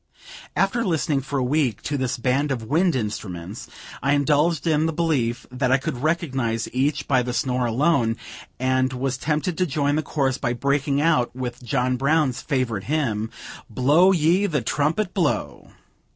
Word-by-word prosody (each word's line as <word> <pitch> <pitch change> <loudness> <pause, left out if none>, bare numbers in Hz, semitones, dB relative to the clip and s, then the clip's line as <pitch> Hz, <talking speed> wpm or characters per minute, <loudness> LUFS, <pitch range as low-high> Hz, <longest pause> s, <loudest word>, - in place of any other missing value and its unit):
After 215 +5 +1
listening 160 -7 0
for 140 +1 -4
a 130 - +1
week 130 -5 0
to 145 - -2
this 130 -2 -1
band 130 +4 0
of 120 -4 -2
wind 165 +8 +2
instruments, 105 -4 -5 0.3
I 140 +3 +2
indulged 150 +4 +2
in 155 -1 +2
the - - 0
belief 150 -8 0
that 125 0 0
I 130 - +5
could 135 -2 -4
recognize 135 -8 -1
each 145 +3 0
by 130 -3 +3
the 125 0 -3
snore 125 -1 0
alone, 120 -2 +2 0.4
and 130 0 +1
was 130 +1 -2
tempted 160 +3 -1
to 185 - +3
join 145 0 0
the - - +1
chorus 135 -3 -1
by 120 -3 -1
breaking 140 +2 0
out 150 -7 +2
with 125 -1 -5
John 125 +1 0
Brown's 140 -2 +1
favorite 125 -8 -1
hymn: 115 -8 -1 0.4
"Blow 145 - +4
ye 180 +3 +3
the 150 - -1
trumpet, 160 - 0
blow!" 170 -7 -1
140 Hz, 165 wpm, -23 LUFS, 125-155 Hz, 0.4 s, I